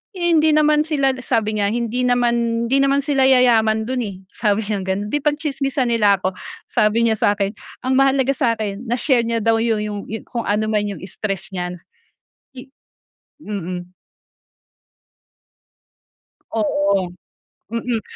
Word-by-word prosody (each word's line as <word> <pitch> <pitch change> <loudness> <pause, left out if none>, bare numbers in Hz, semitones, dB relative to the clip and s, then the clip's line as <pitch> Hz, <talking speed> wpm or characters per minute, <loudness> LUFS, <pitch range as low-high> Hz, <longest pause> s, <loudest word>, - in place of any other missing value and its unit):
Hindi 330 -3 +3
naman 300 0 +3
sila 275 -4 +1
sabi 220 -4 -1
niya, 200 - +2
"Hindi 240 +1 -1
naman, 235 -1 +1
hindi 270 - +2
naman 275 +1 +2
sila 275 -3 +2
yayaman 225 -4 +4
do'n, 255 -1 -1
eh." 195 - -6 0.2
Sabi 210 0 0
niyang 200 -3 -2
gano'n. 200 +2 -1
"Di 295 - +2
pagtsismisan 280 -4 -1
nila 205 -4 +3
ako," 185 - +1 0.4
sabi 215 +2 +2
niya 220 -1 +1
sa 205 - +3
akin. 200 -1 -1 0.3
Ang 260 - +1
mahalaga 270 0 +3
sa 240 -5 +2
akin 215 +2 -5
na-share 245 0 +1
niya 230 0 0
daw 225 0 +3
yu 230 -1 +1
yung 205 -1 -4 0.2
kung 235 -2 -3
anuman 210 0 +1
yung - - -13
stress 195 0 -5
niya. 180 -1 -3 0.8
I 255 +1 -10 0.7
mm. 180 - -6 2.6
Oo. 200 -3 +1 0.6
Mm. 230 0 -2
230 Hz, 140 wpm, -20 LUFS, 205-265 Hz, 2.6 s, yayaman